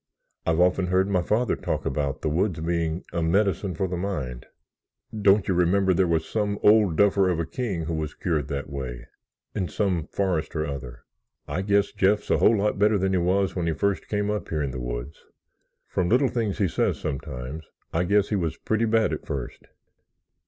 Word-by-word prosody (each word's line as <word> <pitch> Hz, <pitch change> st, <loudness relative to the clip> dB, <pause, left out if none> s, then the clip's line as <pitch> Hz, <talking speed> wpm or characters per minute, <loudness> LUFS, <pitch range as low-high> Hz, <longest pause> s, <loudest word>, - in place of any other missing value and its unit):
I've 80 Hz, 0 st, +2 dB
often 90 Hz, +1 st, +3 dB
heard 95 Hz, +1 st, +2 dB
my 95 Hz, -3 st, +1 dB
father 110 Hz, +6 st, +1 dB
talk -, -, -3 dB
about 70 Hz, 0 st, -2 dB
the -, -, +1 dB
woods 85 Hz, +2 st, 0 dB
being 85 Hz, +1 st, -1 dB
a 85 Hz, -, -1 dB
medicine 95 Hz, +1 st, +1 dB
for 95 Hz, +4 st, -1 dB
the 90 Hz, -, -3 dB
mind. 75 Hz, -11 st, -4 dB, 0.7 s
Don't 100 Hz, -1 st, +4 dB
you 95 Hz, -, +2 dB
remember 95 Hz, +2 st, +3 dB
there 90 Hz, +1 st, +2 dB
was 80 Hz, -1 st, 0 dB
some 105 Hz, -2 st, -1 dB
old 105 Hz, -5 st, +5 dB
duffer 100 Hz, 0 st, +4 dB
of 85 Hz, -2 st, 0 dB
a 85 Hz, -, 0 dB
king 95 Hz, -1 st, -3 dB
who 85 Hz, -, -3 dB
was 80 Hz, -1 st, -3 dB
cured 80 Hz, -6 st, -1 dB
that 70 Hz, 0 st, -4 dB
way—in 70 Hz, -, -7 dB
some 90 Hz, 0 st, -1 dB
forest 90 Hz, -6 st, -1 dB
or 75 Hz, 0 st, 0 dB
other? 65 Hz, -4 st, -7 dB, 0.4 s
I 75 Hz, +5 st, -2 dB
guess 100 Hz, +1 st, +2 dB
Jeff's 100 Hz, +2 st, +1 dB
a -, -, +3 dB
whole 115 Hz, -, +5 dB
lot 100 Hz, 0 st, 0 dB
better 105 Hz, +1 st, +4 dB
than 95 Hz, 0 st, 0 dB
he 95 Hz, -, +2 dB
was 95 Hz, +2 st, +1 dB
when 85 Hz, -3 st, -1 dB
he 80 Hz, -, +1 dB
first 100 Hz, +3 st, -1 dB
came 105 Hz, 0 st, -1 dB
up 105 Hz, -4 st, -3 dB
here 75 Hz, -2 st, -1 dB
in 70 Hz, -, -2 dB
the 65 Hz, -, -5 dB
woods. -, -, -6 dB, 0.6 s
From 90 Hz, -1 st, -1 dB
little 130 Hz, +3 st, +4 dB
things 110 Hz, -5 st, -1 dB
he 100 Hz, -3 st, +2 dB
says 80 Hz, -, 0 dB
sometimes, 70 Hz, +1 st, -5 dB, 0.3 s
I 85 Hz, -, +2 dB
guess 100 Hz, +2 st, +2 dB
he 105 Hz, -, 0 dB
was 85 Hz, -5 st, -1 dB
pretty 110 Hz, +1 st, 0 dB
bad 110 Hz, -1 st, +2 dB
at -, -, -6 dB
first. -, -, -5 dB
90 Hz, 200 wpm, -25 LUFS, 80-100 Hz, 0.7 s, old